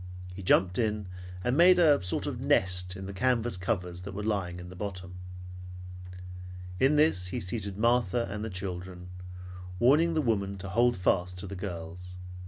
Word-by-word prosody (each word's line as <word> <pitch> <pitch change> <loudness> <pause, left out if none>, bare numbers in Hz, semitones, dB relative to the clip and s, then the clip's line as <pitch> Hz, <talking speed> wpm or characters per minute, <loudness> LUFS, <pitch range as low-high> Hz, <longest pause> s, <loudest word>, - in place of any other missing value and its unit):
He 95 - -8
jumped 95 +1 +3
in, 105 -3 0 0.4
and 125 +1 +1
made 180 +3 +7
a 150 - +5
sort 90 - -2
of - - -4
nest 90 0 +1
in 95 0 -7
the 100 - -6
canvas 120 +2 +1
covers 90 -2 -3
that 95 +1 -8
were 105 - -4
lying 95 -5 -2
in 90 0 -9
the 95 - -10
bottom. 90 -2 -6 1.6
In 135 +6 +4
this 145 - +3
he 110 +7 -3
seated 100 -1 -2
Martha 120 0 +2
and 105 +2 -5
the 110 - -3
children, 90 -1 -6 0.7
warning 150 - +4
the - - +2
woman 100 -5 0
to 95 +1 -7
hold 120 +4 +3
fast 90 0 0
to 90 - -3
the 100 +1 -6
girls. 90 -1 -7
95 Hz, 175 wpm, -29 LUFS, 90-115 Hz, 1.6 s, made